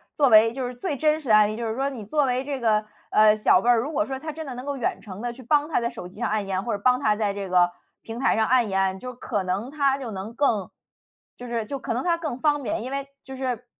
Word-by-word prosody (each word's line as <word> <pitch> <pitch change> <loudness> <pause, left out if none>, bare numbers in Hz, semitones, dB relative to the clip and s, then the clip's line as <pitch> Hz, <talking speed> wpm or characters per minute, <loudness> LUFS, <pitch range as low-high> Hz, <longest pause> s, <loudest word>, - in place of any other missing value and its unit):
作 285 -3 +4
为 225 0 +6
就 260 0 -3
是 245 - -4
最 290 +5 -3
真 305 +2 +2
实 285 -6 -8
的 215 - +7
案 210 -1 +5
例。 215 - -4
就 235 - -3
是 220 - -2
说 270 +2 0
你 240 -7 -8
作 295 +8 +1
为 255 0 0
这 280 -1 -3
个， 215 -2 +2 0.3
呃， 215 0 +6
小 210 -3 +4
辈 240 - +1
儿， 240 - +6
如 275 +7 -3
果 310 0 0
说 265 -1 -4
他 310 +4 -6
真 315 +1 -7
的 260 - -5
能 250 +2 -7
够 285 -1 -3
远 250 - -2
程 200 -1 -9
地 240 0 -3
去 255 +2 -13
帮 295 +4 +2
他 310 - +1
在 235 - 0
手 210 -7 -8
机 180 - -14
上 - - -1
按 210 -2 -1
一 - - -4
按， 185 +1 -1
或 235 - -2
者 200 - -8
帮 250 0 +4
他 215 -5 +2
在 210 -2 0
这 200 -1 -5
个 180 -1 +4 0.3
平 225 0 -8
台 270 - +2
上 220 -1 +2
按 245 -3 +3
一 - - -5
按， 190 0 +1
就 250 +5 -7
可 205 -4 -3
能 190 +6 -2
他 280 -2 +1
就 255 -5 -6
能 200 +3 -6
更， 225 -8 +1 0.7
就 245 - -8
是 230 -2 -2
就 275 +5 -5
可 230 - -3
能 245 - -2
它 340 -1 +2
更 305 -7 -4
方 290 0 +1
便。 230 - -2
因 255 - -6
为 275 0 -4
就 265 - -9
是， 250 -3 -3
240 Hz, 330 characters per minute, -24 LUFS, 215-275 Hz, 0.7 s, 的